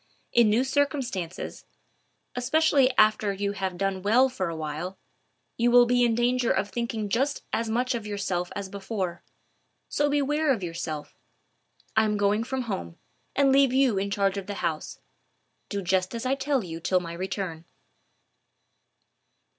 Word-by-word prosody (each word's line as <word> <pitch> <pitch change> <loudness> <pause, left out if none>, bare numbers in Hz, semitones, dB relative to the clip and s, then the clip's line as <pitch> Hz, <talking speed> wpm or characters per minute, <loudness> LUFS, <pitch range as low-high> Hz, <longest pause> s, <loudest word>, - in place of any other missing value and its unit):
In 235 -2 +5
new 225 +4 +3
circumstances, 265 - -2 0.7
especially 275 +1 +3
after 215 -1 +4
you 200 +1 -2
have 190 -2 -3
done 195 0 -1
well 240 +7 +4
for 185 -8 -3
a 165 - -4
while, 160 +4 -5 0.6
you 235 +1 +3
will 245 0 +7
be 245 0 +3
in 235 -2 +3
danger 245 0 +1
of 205 - +1
thinking 230 -3 -3
just 265 +8 0
as 230 0 0
much 250 +3 0
of 225 -3 -4
yourself 190 -4 -2
as 200 -1 -4
before. 190 -3 -4 0.7
So 290 0 +1
beware 290 +1 +1
of 225 -8 0
yourself. 165 -3 -5 0.8
I 220 0 +4
am 210 -1 0
going 205 +2 +2
from 260 +2 -3
home, 85 - -5 0.4
and 275 -1 +4
leave 270 -1 +4
you 260 -7 +3
in 200 +1 -2
charge 200 0 +1
of 195 - -9
the 205 - -4
house. 155 -5 -3 0.7
Do 200 -2 -3
just 185 +2 0
as 230 +2 -4
I 255 - +2
tell 275 -2 0
you 165 -2 -6
till 180 +2 +2
my 170 -1 -7
return." 175 -2 -4
210 Hz, 160 wpm, -26 LUFS, 190-250 Hz, 0.8 s, will